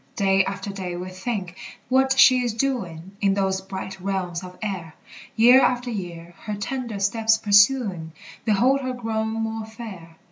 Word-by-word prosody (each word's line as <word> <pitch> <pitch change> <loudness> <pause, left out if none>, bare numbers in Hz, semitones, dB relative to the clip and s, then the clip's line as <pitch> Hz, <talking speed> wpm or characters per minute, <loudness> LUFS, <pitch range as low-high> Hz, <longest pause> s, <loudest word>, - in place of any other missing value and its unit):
Day 195 -2 +3
after 195 +1 -5
day 185 -3 -5
we 180 +1 -6
think 185 -2 -4 0.3
what 265 +1 +2
she 255 -1 +7
is 240 -3 -2
doing 190 -10 -3
In 195 -1 +2
those 190 -1 0
bright 190 0 -7
realms 185 -2 -3
of 180 0 -10
air; 180 -7 -5 0.4
Year 245 +4 +7
after 245 -1 +1
year, 175 -4 -7
her 210 -1 -3
tender 230 0 -4
steps 220 +3 +2
pursuing, 205 -5 +3 0.3
Behold 245 +6 +2
her 255 -1 -3
grown 220 -2 -2
more 225 0 -3
fair. 195 -8 -10
200 Hz, 155 wpm, -23 LUFS, 190-235 Hz, 0.4 s, she